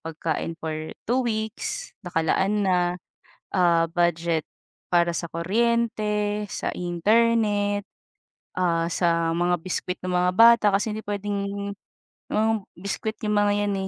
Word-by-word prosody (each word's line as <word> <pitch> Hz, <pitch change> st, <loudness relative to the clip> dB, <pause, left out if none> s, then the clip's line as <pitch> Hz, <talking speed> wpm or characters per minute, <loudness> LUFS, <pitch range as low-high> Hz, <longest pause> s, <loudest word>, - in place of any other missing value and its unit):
pagkain 165 Hz, 0 st, -3 dB
for 160 Hz, -1 st, -3 dB, 0.4 s
2 255 Hz, +2 st, +2 dB
weeks, 220 Hz, -, -3 dB
nakalaan 190 Hz, +5 st, +1 dB
na, 185 Hz, -, +3 dB, 0.8 s
ah, 170 Hz, -3 st, +4 dB
budget 170 Hz, -2 st, +1 dB, 0.5 s
para 170 Hz, 0 st, +4 dB
sa -, -, -2 dB
kuryente 210 Hz, +1 st, 0 dB
sa -, -, -3 dB
internet, 205 Hz, +3 st, +2 dB, 0.7 s
ah, 170 Hz, -2 st, +1 dB
sa 170 Hz, -1 st, +1 dB
mga 175 Hz, +1 st, +2 dB
biscuit 180 Hz, 0 st, -3 dB
ng 185 Hz, 0 st, -2 dB
mga 180 Hz, 0 st, +3 dB
bata 230 Hz, 0 st, +7 dB
kasi 210 Hz, +2 st, 0 dB
hindi 220 Hz, -, -6 dB
puwedeng 200 Hz, 0 st, -3 dB, 0.6 s
mga 220 Hz, +1 st, +2 dB, 0.3 s
biscuit 200 Hz, +3 st, -3 dB
'yong 210 Hz, 0 st, +1 dB
mga 205 Hz, 0 st, +3 dB
'yan, 200 Hz, -, 0 dB
200 Hz, 120 wpm, -25 LUFS, 175-210 Hz, 0.8 s, bata